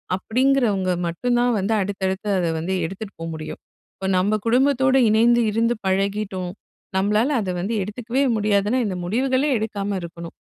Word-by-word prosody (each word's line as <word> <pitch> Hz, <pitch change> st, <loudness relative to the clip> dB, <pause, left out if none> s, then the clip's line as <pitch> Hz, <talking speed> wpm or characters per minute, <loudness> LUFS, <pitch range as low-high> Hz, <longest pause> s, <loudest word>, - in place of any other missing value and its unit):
அப்படீங்கிறவங்க 220 Hz, -3 st, +1 dB, 0.2 s
மட்டும்தான் 240 Hz, +7 st, +1 dB
வந்து, 200 Hz, +4 st, 0 dB
அடுத்தடுத்து 190 Hz, +1 st, -2 dB
அத 175 Hz, -, 0 dB
வந்து 185 Hz, +4 st, -2 dB
எடுத்துட்டு 195 Hz, +4 st, -7 dB
போ -, -, -3 dB
முடியும். 155 Hz, 0 st, -7 dB, 0.4 s
இப்ப 190 Hz, 0 st, -3 dB
நம்ம 205 Hz, +4 st, +2 dB
குடும்பத்தோடு, 265 Hz, +2 st, +3 dB
இணைந்து 235 Hz, +2 st, +4 dB
இருந்து 230 Hz, +2 st, +1 dB
பழகிட்டோம், 195 Hz, -1 st, -1 dB, 0.5 s
நம்மளால 210 Hz, +6 st, +2 dB
அத 190 Hz, -, -4 dB
வந்து 210 Hz, +5 st, -2 dB
எடுத்துக்கவே 240 Hz, +6 st, -2 dB
முடியாதுனா, 210 Hz, +2 st, +1 dB
இந்த 185 Hz, -2 st, -3 dB
முடிவுகளே 260 Hz, +7 st, +1 dB
எடுக்காம 205 Hz, -2 st, -3 dB
இருக்கணும். 170 Hz, 0 st, -9 dB
210 Hz, 135 wpm, -22 LUFS, 190-240 Hz, 0.5 s, இணைந்து